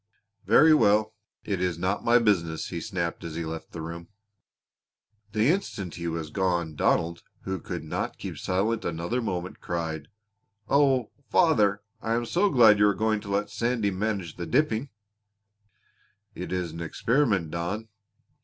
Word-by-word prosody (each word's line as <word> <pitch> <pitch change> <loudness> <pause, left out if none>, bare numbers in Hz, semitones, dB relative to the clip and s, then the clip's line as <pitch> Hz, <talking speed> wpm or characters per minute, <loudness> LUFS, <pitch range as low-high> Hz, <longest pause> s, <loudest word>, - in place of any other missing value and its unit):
"Very 155 +1 +7
well. 110 -4 +4 0.3
It 100 -4 -2
is 90 -3 0
not 95 +4 -1
my 120 +1 +5
business," 90 -9 +1
he 85 -2 -4
snapped 85 -3 -3
as 80 -2 -6
he 85 0 -3
left 80 0 -6
the 80 - -6
room. 85 +1 -7 1.3
The 110 +4 +3
instant 105 - -1
he 85 0 -5
was 80 -2 -4
gone 85 -4 0
Donald, 85 +3 +1 0.2
who 95 -1 -3
could 85 -1 -5
not 80 - -3
keep - - -6
silent 105 +5 0
another 85 +9 -2
moment, 90 -5 -4
cried: 80 -3 -3 0.6
"Oh, 135 -5 +3 0.2
father! 105 - +3 0.2
I 115 0 0
am 120 0 -1
so 180 - +2
glad 115 - +6
you 105 - +6
are 100 - +2
going 110 -1 +1
to 100 - -9
let 100 +1 -1
Sandy 115 -4 0
manage 95 -3 -3
the 85 - -5
dipping!" 135 -2 +1 1.4
"It - - -6
is 90 -3 -2
an 85 +1 -7
experiment, 100 - +1
Don. 90 +7 -3
100 Hz, 155 wpm, -27 LUFS, 85-115 Hz, 1.4 s, Very